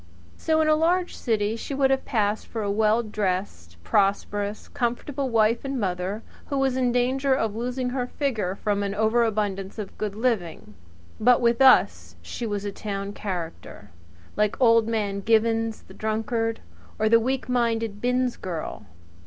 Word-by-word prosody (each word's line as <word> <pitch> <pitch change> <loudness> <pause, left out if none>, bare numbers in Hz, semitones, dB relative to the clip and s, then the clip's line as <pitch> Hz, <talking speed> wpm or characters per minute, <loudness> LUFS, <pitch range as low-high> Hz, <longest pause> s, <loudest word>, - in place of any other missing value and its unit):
So 315 0 +1
in 310 - +2
a 310 - +5
large 345 +3 +1
city 215 -2 0
she 270 +4 -5
would 270 -1 +3
have 270 - 0
passed 210 -2 0
for 225 -2 -4
a 200 - -1
well 220 +2 +2
dressed 185 - -3
prosperous, 200 - 0
comfortable 260 +3 -2
wife 230 0 +2
and 275 -1 -3
mother, 190 +2 -2 0.2
who 280 - -2
was 270 -1 +1
in 255 -2 +1
danger 260 +2 +2
of 220 -5 -1
losing 250 +2 -2
her 250 -1 -2
figure 225 -11 -2
from 205 0 -1
an 200 0 -2
overabundance 215 -3 0
of 210 -3 -6
good 210 -2 -3
living; 210 - -2 0.5
but 245 +2 +5
with 235 +1 +2
us 85 - +5
she 225 - -5
was 205 -1 -3
a 205 - -2
town 200 0 -5
character, 170 - -6 0.4
like 210 0 0
Old 230 -3 +5
Man 205 -3 -1
Givins, 225 +1 +1
the - - -14
drunkard, 225 +1 -2 0.4
or 215 - +1
the 230 +1 +6
weak 260 +3 -2
minded 230 -4 0
Binns 250 0 0
girl. 165 - -6
220 Hz, 160 wpm, -25 LUFS, 205-245 Hz, 0.5 s, the